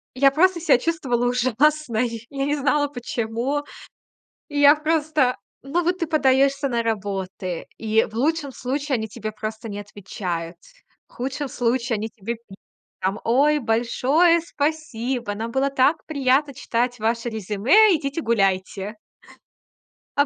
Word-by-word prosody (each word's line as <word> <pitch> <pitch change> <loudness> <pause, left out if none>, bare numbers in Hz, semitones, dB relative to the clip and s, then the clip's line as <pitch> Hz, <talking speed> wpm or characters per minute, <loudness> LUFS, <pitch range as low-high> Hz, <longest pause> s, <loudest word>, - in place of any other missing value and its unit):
Я 275 +1 +5
просто 350 +5 +3
ся 320 -6 +4
чувствовала 255 -5 -1
ужасно 255 +2 +1
и 230 -1 -4
я 275 -1 -2
не 290 +1 +1
знала 290 +1 +1
почему. 245 +2 -2 0.9
И 290 - -4
я 290 +1 +8
просто 305 -4 +1 0.3
ну 295 +6 -1
вот 355 +2 0
ты 335 - -1
подаёшься 275 -2 +2
на 235 -2 0
работы. 195 -4 -3
И 220 0 +2
в - - -15
лучшем 285 +3 0
случае 275 +3 -2
они 220 -3 -1
тебе 215 0 -6
просто 220 +1 -6
не 205 -1 -5
отвечают. 180 -4 -5 0.5
В - - -27
худшем 265 +3 -3
случае 240 -1 0
они 215 +1 -3
тебе 225 +1 -5
пишут 225 -4 -16 0.4
там: 195 +3 -1
"Oй, 285 +6 +3
большое 265 +8 +2
спасибо, 270 -8 -2
нам 225 +2 -4
было 270 +3 +1
так 275 +3 +3
приятно 280 -1 +1
читать 245 0 -1
ваше 230 +2 -1
резюме, 225 - +4
идите 290 +1 -2
гуляйте". 195 -2 0 1.2
А 285 - +5
250 Hz, 140 wpm, -23 LUFS, 220-290 Hz, 1.2 s, я